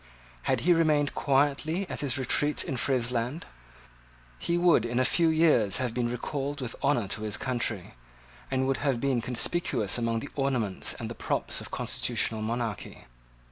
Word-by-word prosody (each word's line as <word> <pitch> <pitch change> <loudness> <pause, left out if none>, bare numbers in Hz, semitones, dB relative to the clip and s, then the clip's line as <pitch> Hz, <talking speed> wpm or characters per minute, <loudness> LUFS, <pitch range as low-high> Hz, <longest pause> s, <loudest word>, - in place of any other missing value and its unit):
Had - - +2
he 175 +2 +5
remained 155 -3 +2
quietly 145 +6 +1
at - - -5
his 140 -2 -1
retreat 145 +3 +1
in 135 - -3
Friesland, 125 +3 0 0.9
he 170 - 0
would 175 -9 +4
in 120 +1 -1
a 130 - +3
few 165 +4 +3
years 155 - +4
have 125 -3 -1
been 120 -1 0
recalled 140 +3 -3
with 125 -3 -5
honour 140 -7 +2
to 105 - -2
his 105 -1 -1
country, 120 -7 -2 0.6
and 130 0 0
would 135 0 +1
have 135 -5 0
been 130 -2 +1
conspicuous 125 - 0
among 115 -1 0
the 140 - -7
ornaments 125 -8 0
and - - -5
the - - -5
props - - -2
of - - -9
constitutional 110 -1 -1
monarchy. 115 -2 -4
130 Hz, 165 wpm, -28 LUFS, 115-145 Hz, 0.9 s, he